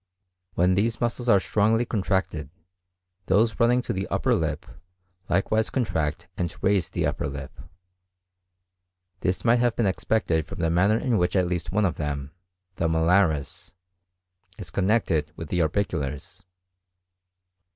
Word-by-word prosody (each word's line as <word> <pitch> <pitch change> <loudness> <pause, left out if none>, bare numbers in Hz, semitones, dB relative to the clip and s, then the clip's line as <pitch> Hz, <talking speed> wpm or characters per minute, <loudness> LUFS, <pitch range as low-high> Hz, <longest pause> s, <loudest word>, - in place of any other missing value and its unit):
When 90 +2 +3
these 110 +4 0
muscles 120 +1 -1
are 100 - +6
strongly 110 +4 +1
contracted, 95 -8 -1 0.8
those 105 +4 +2
running 120 +1 +3
to - - -2
the 95 0 -3
upper - - +1
lip - - -1 0.6
likewise 110 +5 +1
contract 80 - -2
and 85 -2 -3
raise 95 -3 +2
the - - -1
upper - - -1
lip. 70 -1 -8 1.6
This 95 +4 -1
might 120 +1 +4
have 120 -1 +2
been 115 - +1
expected 95 -5 0
from - - -8
the 80 -1 0
manner 95 +6 +3
in 120 -2 +1
which 90 +2 0
at 95 -1 +3
least 85 -2 -3
one 105 +2 +2
of 90 - -1
them, 70 -2 -4 0.5
the 85 - +1
malaris, 80 -2 +1 0.8
is 90 -6 -8
connected 95 -7 +1
with 80 -2 -8
the 90 - 0
orbiculars. 80 0 -2
95 Hz, 140 wpm, -25 LUFS, 80-110 Hz, 1.6 s, are